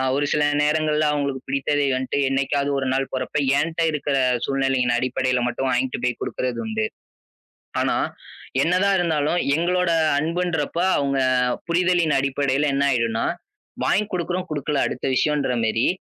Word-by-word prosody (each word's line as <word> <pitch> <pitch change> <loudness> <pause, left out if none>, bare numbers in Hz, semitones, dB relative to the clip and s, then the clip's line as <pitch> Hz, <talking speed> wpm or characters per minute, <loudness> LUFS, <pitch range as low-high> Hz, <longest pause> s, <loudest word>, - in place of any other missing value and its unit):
ஒரு 145 +1 +1
சில 150 - +2 0.2
நேரங்கள்ல, 150 0 +1
அவங்களுக்கு 140 -2 -2
பிடித்ததை 140 +1 0
வந்துட்டு 130 +1 -2
என்னைக்காவது 140 +1 0
ஒரு 130 - -2
நாள் 135 0 +1
போறப்ப, 130 +3 -4 0.2
என்கிட்ட 160 +3 -1
இருக்கிற 145 -2 -1 0.3
சூழ்நிலையின் 135 -3 +1
அடிப்படையில 130 0 0
மட்டும் 125 +2 -2
வாங்கிட்டு 125 +1 -1
போய்க் 125 -1 -1
குடுக்கிறது 125 -2 -3
உண்டு. 110 0 -1 1.0
ஆனா - - +1 0.7
என்னதான் 185 +3 +2
இருந்தாலும் 160 -1 +1 0.2
எங்களோட 180 +1 +1 0.3
அன்புன்றப்போ 170 0 -1 0.2
அவங்க 140 -1 0 0.4
அ-புரிதலின் 175 -2 +1
அடிப்படையில 140 +1 0
என்ன 140 0 +1
ஆயிடுனா, 115 -2 0 0.6
வாங்கிக் 210 +1 +1
கொடுக்கிறோம், 180 +1 -2
குடுக்கல, 145 -1 -1
அடுத்த 125 - -5
விஷயம்ன்ற 145 -1 +1
மாதிரி 110 +2 +1
145 Hz, 130 wpm, -22 LUFS, 130-160 Hz, 1.0 s, சில